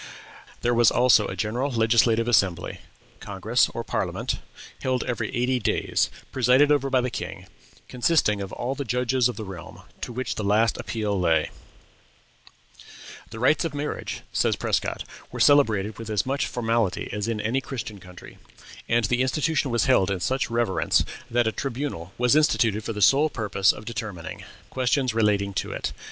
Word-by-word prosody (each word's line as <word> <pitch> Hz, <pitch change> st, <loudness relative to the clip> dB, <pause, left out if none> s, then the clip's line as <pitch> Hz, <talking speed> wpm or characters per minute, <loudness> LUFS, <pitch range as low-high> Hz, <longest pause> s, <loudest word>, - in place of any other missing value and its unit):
There 120 Hz, -, +1 dB
was 120 Hz, -1 st, +5 dB
also 120 Hz, -4 st, +4 dB
a -, -, -5 dB
general 120 Hz, +6 st, -1 dB
legislative 115 Hz, 0 st, +3 dB
assembly, 95 Hz, -7 st, +1 dB, 0.4 s
congress, 105 Hz, +5 st, +1 dB
or 115 Hz, -, -5 dB
parliament, -, -, -2 dB, 0.4 s
held 130 Hz, -1 st, 0 dB
every 115 Hz, -3 st, -3 dB
eighty 125 Hz, +1 st, +1 dB
days, 110 Hz, -, 0 dB, 0.2 s
presided 130 Hz, +3 st, +4 dB
over 140 Hz, -2 st, +2 dB
by 130 Hz, -1 st, +3 dB
the 125 Hz, 0 st, -2 dB
king, -, -, -6 dB, 0.4 s
consisting 125 Hz, -5 st, +1 dB
of 95 Hz, -1 st, -6 dB
all 125 Hz, +2 st, -3 dB
the 140 Hz, -, -4 dB
judges 125 Hz, 0 st, +1 dB
of 125 Hz, -, -5 dB
the 110 Hz, -, -6 dB
realm, 90 Hz, -4 st, -10 dB, 0.2 s
to -, -, -4 dB
which 130 Hz, +2 st, -3 dB
the 110 Hz, -, -4 dB
last 105 Hz, +3 st, +2 dB
appeal 105 Hz, -3 st, -2 dB
lay 80 Hz, -3 st, +2 dB, 1.8 s
"The 110 Hz, -, -9 dB
rites 130 Hz, +9 st, +3 dB
of 160 Hz, -4 st, -3 dB
marriage," 145 Hz, +1 st, -4 dB
says -, -, +2 dB
Prescott, -, -, -1 dB, 0.3 s
"were -, -, -7 dB
celebrated 110 Hz, -8 st, +3 dB
with 115 Hz, -1 st, -7 dB
as 105 Hz, -2 st, 0 dB
much 135 Hz, +2 st, -1 dB
formality 115 Hz, -5 st, -1 dB
as 105 Hz, +1 st, -2 dB
in 115 Hz, -2 st, -2 dB
any 115 Hz, +5 st, 0 dB
Christian 115 Hz, -6 st, -6 dB
country; 90 Hz, -1 st, -13 dB, 0.5 s
and 115 Hz, -1 st, +3 dB
the 120 Hz, +4 st, +1 dB
institution 140 Hz, +2 st, 0 dB
was 120 Hz, -3 st, +1 dB
held 95 Hz, -, +3 dB
in 95 Hz, -2 st, -1 dB
such 130 Hz, +5 st, -1 dB
reverence 115 Hz, -4 st, +1 dB, 0.2 s
that 120 Hz, 0 st, +2 dB
a 110 Hz, -, +1 dB
tribunal 125 Hz, -, -4 dB
was 125 Hz, +3 st, +3 dB
instituted 115 Hz, -8 st, +2 dB
for 115 Hz, -, -3 dB
the 105 Hz, -1 st, 0 dB
sole 145 Hz, +8 st, +5 dB
purpose 105 Hz, -5 st, +2 dB
of 105 Hz, -, -10 dB
determining 105 Hz, -7 st, -6 dB, 0.3 s
questions 130 Hz, -1 st, +1 dB
relating 105 Hz, -3 st, +1 dB
to -, -, -3 dB
it. -, -, -4 dB
115 Hz, 170 wpm, -25 LUFS, 105-130 Hz, 1.8 s, was